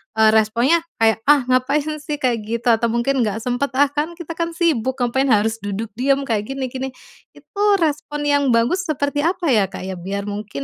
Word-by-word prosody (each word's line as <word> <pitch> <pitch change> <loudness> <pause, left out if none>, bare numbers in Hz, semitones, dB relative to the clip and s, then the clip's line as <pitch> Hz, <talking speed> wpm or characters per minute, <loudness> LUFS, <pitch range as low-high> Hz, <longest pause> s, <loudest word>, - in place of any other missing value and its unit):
eee, 220 0 +5
responsnya 230 +9 +3 0.2
kayak, 225 -1 +3
"Ah, 290 -2 +5
ngapain, 285 +4 +1
sih, 295 0 -4
kayak 255 -5 0
gitu." 235 +2 -3
Atau 230 +1 +2
mungkin, 235 +4 0
"Nggak 210 +2 -4
sempat, 250 +3 -2
ah, 280 +1 +3
kan, 305 +4 -2
kita, 340 -1 -8
kan, 335 0 -2
sibuk, 260 -8 +1
ngapain 255 +3 +1
harus 225 -1 +2
duduk 205 +2 -5
diam 275 +2 +2
kayak 215 -5 -2
gini 270 -1 -3
gini." 265 +1 -4 0.5
Itu 405 - -13 0.2
respons 295 -2 -2
yang 285 0 +3
bagus 315 +12 +1
seperti 285 -1 -1
apa, 345 -2 0
ya, 210 -5 +3
Kak, 185 - -8
ya, 190 0 -5
biar 195 +3 -4
mungkin 205 -8 -5
260 Hz, 200 wpm, -20 LUFS, 225-295 Hz, 0.5 s, eee